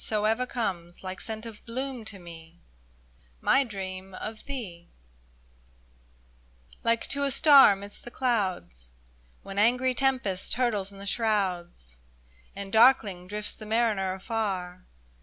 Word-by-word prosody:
So 215 -1 0
ever 225 +4 +1
comes, 185 -9 -4
like 185 0 -5
scent 220 0 -4
of 220 -2 -10
bloom 255 0 -5
to 205 -2 -7
me, 170 -1 -13 0.8
My 275 - +4
dream 190 -4 -7
of 215 +3 -7
thee! 200 -12 -7 1.9
Like 230 0 +1
to 280 0 +1
a 280 - +1
star 275 -5 +8
Amidst 200 +1 -9
the - - -8
clouds. 190 - -2 0.5
When 195 0 -5
angry 250 +4 +3
tempest 250 -8 +1
hurtles 215 -6 0
in 200 - -13
the 200 - -9
shrouds, 185 - -1 0.6
And 200 -1 -7
darkling 220 -6 +4
drifts 210 +1 -4
the 215 - -11
mariner 215 -4 +1
afar. 190 -3 -4
210 Hz, 130 wpm, -27 LUFS, 185-235 Hz, 1.9 s, star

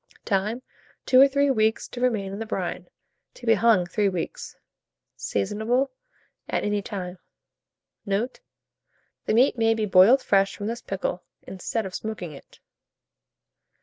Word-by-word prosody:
Time. 210 +5 -1 0.4
2 255 0 +6
or 275 - +9
3 280 0 +2
weeks 220 -2 +1
to 245 - -8
remain 210 -6 0
in 200 - -6
the 225 - -4
brine; - - -4 0.5
to 245 - -12
be 225 - +5
hung 215 -3 +4
3 200 +3 +1
weeks. 180 -3 -5 0.6
Seasonable 220 - -1 0.6
at - - -1
any 205 0 0
time. 185 -3 -6 0.8
Note. 210 +5 -2 0.9
The - - +2
meat 250 0 +4
may 225 0 +3
be 220 -1 -1
boiled 205 +7 +6
fresh 195 0 +2
from 205 - -6
this 230 +3 -3
pickle, 185 -2 -3 0.2
instead 195 +4 -4
of 190 - -7
smoking 215 -7 -5
it. 140 - -14
215 Hz, 145 wpm, -25 LUFS, 195-235 Hz, 0.9 s, or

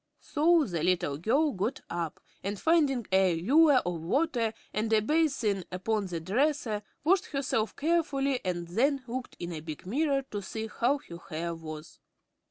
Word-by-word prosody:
So 325 +2 +3
the 175 - -3
little 170 -5 +1
girl 275 - +2
got 210 +5 -2
up 170 -2 -4 0.2
and, 200 +1 -3
finding 290 -8 +2
a 190 -2 +4
ewer 275 - +5
of 175 -2 -2
water 240 - +1 0.2
and 220 +1 -1
a 220 - +5
basin 240 - +1
upon 200 +2 -1
the 175 -2 -3
dresser, 225 - 0 0.2
washed 360 +4 +3
herself 270 -6 -1
carefully 280 -5 +1
and 175 -2 -2
then 270 +8 +1
looked 250 +1 -5
in 175 0 -5
a 160 - -4
big 155 0 -8
mirror 275 +6 +1
to 205 - -3
see 220 +3 -5
how 260 +5 +3
her 170 0 -8
hair 170 +2 -3
was. 155 -1 -9
220 Hz, 165 wpm, -29 LUFS, 180-280 Hz, 0.2 s, ewer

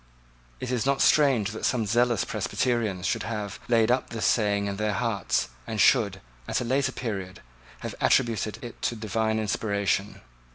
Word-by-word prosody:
It 130 - -4
is 125 -3 0
not 135 +1 +1
strange 130 -9 +4
that 110 - -7
some 120 -3 +1
zealous 115 -2 +2
Presbyterians 105 -1 -1
should 115 +3 0
have 105 -3 -4
laid 115 -1 +3
up 130 +1 0
his 115 -2 -2
saying 100 -3 +2
in 100 -1 -3
their 105 0 0
hearts, 105 - 0 0.2
and 110 - -3
should, 100 -4 +4 0.3
at - - 0
a - - -2
later 135 +2 +1
period, 100 -8 -5 0.4
have - - -5
attributed 110 -2 +2
it 120 - -9
to 120 - -1
divine 110 0 -1
inspiration. 100 -1 -1
110 Hz, 165 wpm, -26 LUFS, 100-120 Hz, 0.4 s, strange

